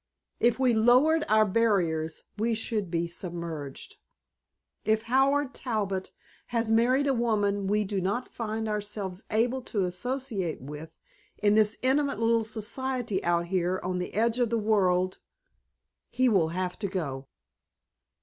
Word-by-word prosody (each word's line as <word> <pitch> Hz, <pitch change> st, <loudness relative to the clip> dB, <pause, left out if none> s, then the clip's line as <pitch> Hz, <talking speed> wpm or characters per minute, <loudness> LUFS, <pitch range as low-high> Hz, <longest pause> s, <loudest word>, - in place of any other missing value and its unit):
If 240 Hz, 0 st, +3 dB
we 255 Hz, -2 st, +3 dB
lowered 255 Hz, +8 st, +4 dB
our 215 Hz, 0 st, +5 dB
barriers 185 Hz, -7 st, +1 dB
we 225 Hz, +2 st, 0 dB
should 215 Hz, -4 st, -2 dB
be 170 Hz, 0 st, 0 dB
submerged. 170 Hz, -5 st, -6 dB, 0.9 s
If 220 Hz, +1 st, +1 dB
Howard 270 Hz, +3 st, +2 dB
Talbot 200 Hz, -6 st, -2 dB, 0.4 s
has 230 Hz, -2 st, -1 dB
married 250 Hz, +5 st, +3 dB
a 275 Hz, -, +2 dB
woman 205 Hz, -4 st, +1 dB
we 210 Hz, +2 st, +2 dB
do 200 Hz, -1 st, -2 dB
not 205 Hz, +7 st, -1 dB
find 220 Hz, -1 st, -3 dB
ourselves 205 Hz, -2 st, -3 dB
able 240 Hz, +4 st, +1 dB
to 210 Hz, -5 st, -2 dB
associate 210 Hz, -, -3 dB
with 150 Hz, +4 st, -8 dB, 0.5 s
in 205 Hz, -1 st, +3 dB
this 215 Hz, 0 st, +3 dB
intimate 280 Hz, 0 st, +2 dB
little 230 Hz, 0 st, +3 dB
society 230 Hz, 0 st, -2 dB
out 170 Hz, 0 st, +1 dB
here 185 Hz, 0 st, 0 dB
on 180 Hz, 0 st, -2 dB
the 180 Hz, -, -5 dB
edge 230 Hz, +3 st, +2 dB
of 240 Hz, -2 st, +2 dB
the 230 Hz, -, +1 dB
world, 185 Hz, -4 st, +1 dB, 0.9 s
he 255 Hz, +1 st, +2 dB
will 190 Hz, -9 st, +3 dB
have 180 Hz, +1 st, -3 dB
to 200 Hz, -, -1 dB
go." 140 Hz, -8 st, -4 dB
215 Hz, 140 wpm, -28 LUFS, 185-235 Hz, 0.9 s, our